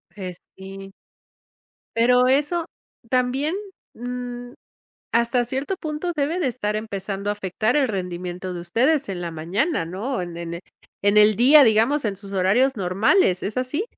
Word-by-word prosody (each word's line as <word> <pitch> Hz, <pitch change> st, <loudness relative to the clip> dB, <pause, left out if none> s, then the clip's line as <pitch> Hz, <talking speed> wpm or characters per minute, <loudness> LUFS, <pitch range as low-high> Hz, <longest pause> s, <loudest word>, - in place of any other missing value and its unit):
Pues, 185 Hz, -3 st, -7 dB, 0.2 s
sí. 195 Hz, 0 st, -10 dB, 1.0 s
Pero 250 Hz, +2 st, +4 dB
eso 295 Hz, +6 st, +1 dB, 0.4 s
también, 260 Hz, +6 st, +1 dB, 0.4 s
mm, 245 Hz, 0 st, -6 dB, 0.6 s
hasta 235 Hz, +1 st, +2 dB
cierto 270 Hz, +10 st, -3 dB
punto, 310 Hz, +3 st, -3 dB
debe 305 Hz, +5 st, 0 dB
de 300 Hz, -, +1 dB
estar 210 Hz, -4 st, -2 dB
empezando 200 Hz, -2 st, -4 dB
a -, -, +2 dB
afectar 210 Hz, +5 st, -1 dB
el 275 Hz, -3 st, +3 dB
rendimiento 180 Hz, -2 st, -4 dB
de 175 Hz, -, -5 dB
ustedes 260 Hz, -, +1 dB
en 185 Hz, -2 st, -4 dB
la 170 Hz, -1 st, -4 dB
mañana, 170 Hz, -, -1 dB
¿no? 195 Hz, +8 st, -3 dB
En 175 Hz, -1 st, -7 dB
en 170 Hz, 0 st, -5 dB, 0.4 s
en 205 Hz, +1 st, +3 dB
el 210 Hz, 0 st, +6 dB
día, 280 Hz, +5 st, +7 dB
digamos, 230 Hz, +6 st, +3 dB
en 205 Hz, -3 st, -1 dB
sus 200 Hz, 0 st, -9 dB
horarios 210 Hz, +8 st, +2 dB
normales, 195 Hz, -, +2 dB
¿es 210 Hz, +4 st, -4 dB
así? 255 Hz, +9 st, -1 dB
225 Hz, 150 wpm, -23 LUFS, 190-265 Hz, 1.0 s, día